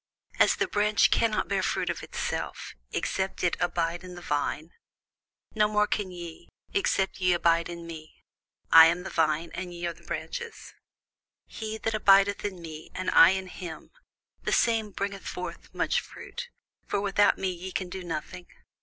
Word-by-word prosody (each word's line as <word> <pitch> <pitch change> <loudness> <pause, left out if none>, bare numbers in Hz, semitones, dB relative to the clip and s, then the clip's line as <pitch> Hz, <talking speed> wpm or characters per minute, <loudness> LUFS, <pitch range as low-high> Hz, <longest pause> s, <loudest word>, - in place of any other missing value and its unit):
As - - +5
the - - 0
branch 210 0 +3
cannot 220 -2 +2
bear 195 -1 0
fruit - - 0
of - - -6
itself, - - -4 0.2
except 190 0 -2
it 175 - +2
abide 175 0 -1
in 180 -1 -9
the 175 - -9
vine; 150 +2 -2 0.8
no 210 -1 +3
more 210 0 +2
can 205 -2 -2
ye, 175 -2 -9 0.2
except 200 - +1
ye 180 -1 +4
abide 170 -1 +2
in 170 -1 -7
me. 160 -2 -9 0.6
I 165 0 +11
am 175 +2 0
the 190 - -6
vine, 160 0 +1
ye 175 -2 -5
are 170 - -2
the - - -20
branches: 475 -2 -6 0.7
He 220 -1 -6
that 225 0 -2
abideth 200 -1 +4
in 195 -3 -4
me, 155 -1 -9
and 185 - -1
I 165 - +9
in 190 0 -1
him, 175 -3 -8 0.5
the - - -2
same 225 -2 +2
bringeth 200 0 -4
forth 180 - -6
much - - 0
fruit: 485 0 -9 0.4
for - - 0
without 205 0 +3
me 190 -1 -1
ye 180 +1 -7
can 185 0 -2
do 185 +1 -6
nothing. 175 +1 -6
185 Hz, 170 wpm, -28 LUFS, 170-205 Hz, 0.8 s, I